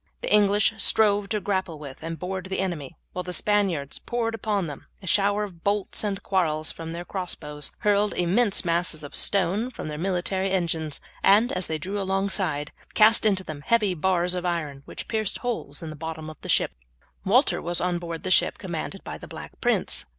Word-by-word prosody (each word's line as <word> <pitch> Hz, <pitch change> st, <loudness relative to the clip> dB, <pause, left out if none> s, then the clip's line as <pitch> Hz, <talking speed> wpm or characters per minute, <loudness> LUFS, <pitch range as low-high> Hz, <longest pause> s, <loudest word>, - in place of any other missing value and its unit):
The -, -, 0 dB
English 210 Hz, +1 st, +5 dB
strove 205 Hz, -2 st, +4 dB
to 215 Hz, -, 0 dB
grapple 190 Hz, -4 st, -1 dB
with 140 Hz, -3 st, -9 dB
and 165 Hz, +1 st, -4 dB
board 185 Hz, +1 st, -4 dB
the 190 Hz, -, -2 dB
enemy, 170 Hz, -8 st, -3 dB, 0.2 s
while 180 Hz, -, -2 dB
the 180 Hz, 0 st, -5 dB
Spaniards 185 Hz, -9 st, 0 dB
poured 235 Hz, -1 st, -2 dB
upon 210 Hz, -4 st, -1 dB
them 145 Hz, -3 st, -8 dB
a 195 Hz, -, -12 dB
shower 200 Hz, +2 st, +3 dB
of 180 Hz, -5 st, -8 dB
bolts 200 Hz, +1 st, 0 dB
and 200 Hz, -2 st, -2 dB
quarrels 155 Hz, -5 st, +1 dB
from 165 Hz, 0 st, -7 dB
their 170 Hz, +1 st, -5 dB
cross 185 Hz, -2 st, -3 dB
bows, 150 Hz, -1 st, -5 dB
hurled 205 Hz, 0 st, +2 dB
immense 195 Hz, +4 st, +3 dB
masses 170 Hz, -2 st, 0 dB
of 145 Hz, -, -8 dB
stone 200 Hz, +5 st, +2 dB
from 200 Hz, -, -6 dB
their 150 Hz, 0 st, -5 dB
military 190 Hz, +1 st, 0 dB
engines, 165 Hz, -5 st, -1 dB, 0.2 s
and, 215 Hz, +5 st, +5 dB
as 185 Hz, -1 st, -2 dB
they 160 Hz, -, -1 dB
drew 195 Hz, +6 st, -3 dB
alongside, 190 Hz, -6 st, -1 dB, 0.2 s
cast 220 Hz, 0 st, +6 dB
into 190 Hz, -3 st, +2 dB
them 155 Hz, -5 st, -7 dB
heavy 210 Hz, +2 st, +2 dB
bars 180 Hz, +1 st, +1 dB
of 180 Hz, -1 st, -1 dB
iron, 160 Hz, -6 st, -2 dB
which -, -, -7 dB
pierced 215 Hz, -3 st, 0 dB
holes 225 Hz, -, -3 dB
in 160 Hz, -, -5 dB
the -, -, -7 dB
bottom 160 Hz, 0 st, -6 dB
of 155 Hz, -, -16 dB
the -, -, -8 dB
ship. -, -, +3 dB, 0.5 s
Walter -, -, +3 dB
was 175 Hz, +1 st, -1 dB
on 175 Hz, -1 st, 0 dB
board 170 Hz, -1 st, -6 dB
the 185 Hz, -, -2 dB
ship -, -, +4 dB
commanded -, -, -5 dB
by -, -, -7 dB
the -, -, -10 dB
Black -, -, -8 dB
Prince. -, -, +1 dB
185 Hz, 200 wpm, -26 LUFS, 165-205 Hz, 0.5 s, cast